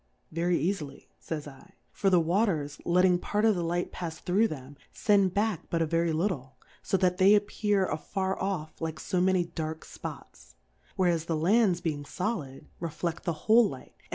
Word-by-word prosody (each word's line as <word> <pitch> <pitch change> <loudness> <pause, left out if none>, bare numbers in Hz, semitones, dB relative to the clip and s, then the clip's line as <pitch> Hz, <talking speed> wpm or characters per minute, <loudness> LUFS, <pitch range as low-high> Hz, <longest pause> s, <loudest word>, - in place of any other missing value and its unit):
Very 170 +2 +1
eafily, 155 -5 -3
/^jj' 145 -4 -7
/> - - -42
for 195 - +1
the 180 -2 +5
Wa 175 +7 +2
ters 150 -8 -2
letting 180 +1 +4
part 210 +4 0
of 220 - +5
the 180 - -2
Light 175 +1 -1
pafs 165 -3 -5
thro' 195 +5 +2
them, 140 -5 -8 0.2
fend 200 -3 +2
back 205 -4 -1
but 170 - 0
a - - +1
very 165 +1 +1
Httle, 155 -6 -1 0.3
fo 195 - 0
that 180 -1 +2
they 195 +2 +7
appear 205 -1 +1
afar 190 +4 -2
off 175 -6 -3
like 160 -2 -3
fo 180 +5 -1
many 185 -1 +3
dark 160 -2 -5
Spots; - - -10 0.4
whereas 175 -3 +1
the 165 -1 -1
Lands 185 +1 +3
being 155 -4 -2
folid, 160 - -4 0.2
reflefl: 165 0 -3
the 170 - -1
whole 220 -1 +6
Light, 130 - -10
and. - - -27
175 Hz, 180 wpm, -29 LUFS, 160-195 Hz, 0.4 s, they